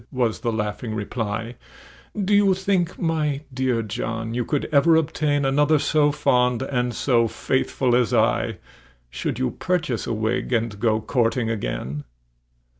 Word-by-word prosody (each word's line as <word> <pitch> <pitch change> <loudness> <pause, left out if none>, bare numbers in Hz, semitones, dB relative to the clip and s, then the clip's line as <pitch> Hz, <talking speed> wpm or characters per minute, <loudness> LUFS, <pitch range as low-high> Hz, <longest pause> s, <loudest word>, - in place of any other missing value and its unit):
was 120 -4 0
the 115 - -1
laughing 110 +1 -3
reply; 110 +1 -3 0.7
"Do 200 +1 +1
you 200 -2 +5
think, 190 -2 0
my 155 -4 -1
dear 125 -3 0
John, 110 +2 -4
you 120 0 0
could 145 +3 -1
ever 155 +3 +5
obtain 150 -2 +1
Another 145 +3 +3
so 145 0 +2
fond 125 -3 +2
and 125 -2 -1
so 120 -2 +2
faithful 130 +1 0
as 120 -3 +2
I, - - +1 0.5
Should - - -3
you 65 - 0
purchase 160 -10 -2
a - - -1
wig, 115 +4 -1
and 115 -3 -1
go 110 0 +1
courting 115 0 0
again?" 75 - -4
125 Hz, 145 wpm, -23 LUFS, 115-150 Hz, 0.7 s, you